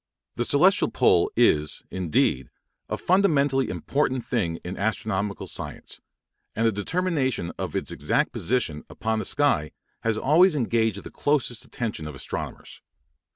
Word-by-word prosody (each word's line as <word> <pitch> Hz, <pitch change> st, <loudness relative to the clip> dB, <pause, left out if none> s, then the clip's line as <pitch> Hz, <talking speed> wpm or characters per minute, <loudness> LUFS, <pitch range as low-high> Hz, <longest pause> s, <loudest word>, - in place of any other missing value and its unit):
The 120 Hz, -, -1 dB
celestial 180 Hz, +10 st, +4 dB
pole -, -, +3 dB
is, 75 Hz, 0 st, +2 dB
indeed, 75 Hz, -7 st, 0 dB, 0.4 s
a -, -, -2 dB
fundamentally 145 Hz, -8 st, +2 dB
important 130 Hz, -3 st, -1 dB
thing 90 Hz, -9 st, -1 dB
in 90 Hz, +2 st, -5 dB
astronomical 105 Hz, -1 st, -2 dB
science, -, -, -7 dB, 0.5 s
and 115 Hz, -, +1 dB
the 115 Hz, -, +4 dB
determination 130 Hz, -, -1 dB
of -, -, -4 dB
its -, -, -2 dB
exact -, -, 0 dB
position 95 Hz, -12 st, -1 dB
upon 110 Hz, 0 st, -2 dB
the 110 Hz, -, -3 dB
sky 135 Hz, -, +1 dB, 0.3 s
has 115 Hz, -1 st, 0 dB
always 160 Hz, -, +4 dB
engaged 115 Hz, -5 st, 0 dB
the -, -, -9 dB
closest 140 Hz, -5 st, 0 dB
attention 105 Hz, -10 st, -4 dB
of 75 Hz, -, -7 dB
astronomers. 65 Hz, -, -6 dB
115 Hz, 135 wpm, -25 LUFS, 95-145 Hz, 0.5 s, celestial